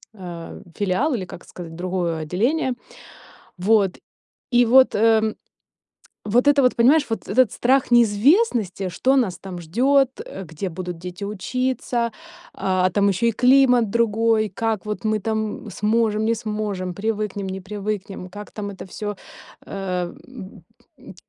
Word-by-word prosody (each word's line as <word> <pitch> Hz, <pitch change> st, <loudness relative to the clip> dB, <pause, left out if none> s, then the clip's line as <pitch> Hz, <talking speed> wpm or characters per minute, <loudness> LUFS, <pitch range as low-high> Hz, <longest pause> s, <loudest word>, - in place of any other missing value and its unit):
а, 175 Hz, -4 st, -8 dB, 0.2 s
филиал 205 Hz, +10 st, 0 dB
или, 195 Hz, -6 st, -2 dB
как 180 Hz, -, -11 dB
сказать, 165 Hz, -2 st, -10 dB
другое 175 Hz, -2 st, -2 dB
отделение. 245 Hz, -, 0 dB, 0.8 s
Вот, 195 Hz, 0 st, +2 dB, 0.5 s
и 245 Hz, 0 st, +5 dB
вот, 260 Hz, +3 st, +5 dB
эм, 220 Hz, 0 st, +3 dB, 0.9 s
вот 240 Hz, +6 st, +2 dB
это 290 Hz, -1 st, +5 dB
вот, 250 Hz, -, +3 dB
понимаешь, 280 Hz, +6 st, +5 dB
вот 225 Hz, -, -4 dB
этот 250 Hz, +2 st, +3 dB
страх 260 Hz, +1 st, +1 dB
неизвестности, 230 Hz, -, +3 dB
что 260 Hz, +9 st, +1 dB
нас 190 Hz, -9 st, +1 dB
там 185 Hz, -2 st, -7 dB
ждёт, 260 Hz, -, +2 dB, 0.2 s
э, 195 Hz, -, -8 dB
где 165 Hz, +4 st, -5 dB
будут 180 Hz, 0 st, -6 dB
дети 180 Hz, +3 st, -7 dB
учиться, 240 Hz, +3 st, -2 dB, 0.4 s
а 185 Hz, -1 st, +1 dB
там 200 Hz, +2 st, +2 dB
ещё 195 Hz, +4 st, 0 dB
и 230 Hz, -, +3 dB
климат 250 Hz, -1 st, +4 dB
другой, 225 Hz, -1 st, +2 dB
как 220 Hz, 0 st, -2 dB
вот 210 Hz, +1 st, -5 dB
мы 215 Hz, 0 st, +1 dB
там 220 Hz, +1 st, -3 dB
сможем, 215 Hz, +1 st, +1 dB
не 230 Hz, +1 st, +2 dB
сможем, 210 Hz, -5 st, -3 dB
привыкнем, 210 Hz, -2 st, -2 dB
не 190 Hz, 0 st, -4 dB
привыкнем, 200 Hz, -1 st, -5 dB
как 205 Hz, +2 st, -10 dB
там 205 Hz, -1 st, -5 dB
это 195 Hz, -, -9 dB
всё, 205 Hz, +2 st, -5 dB, 0.5 s
эм, 180 Hz, -3 st, -4 dB
б 240 Hz, -7 st, -11 dB, 0.4 s
м, -, -, -13 dB
210 Hz, 145 wpm, -22 LUFS, 190-235 Hz, 0.9 s, и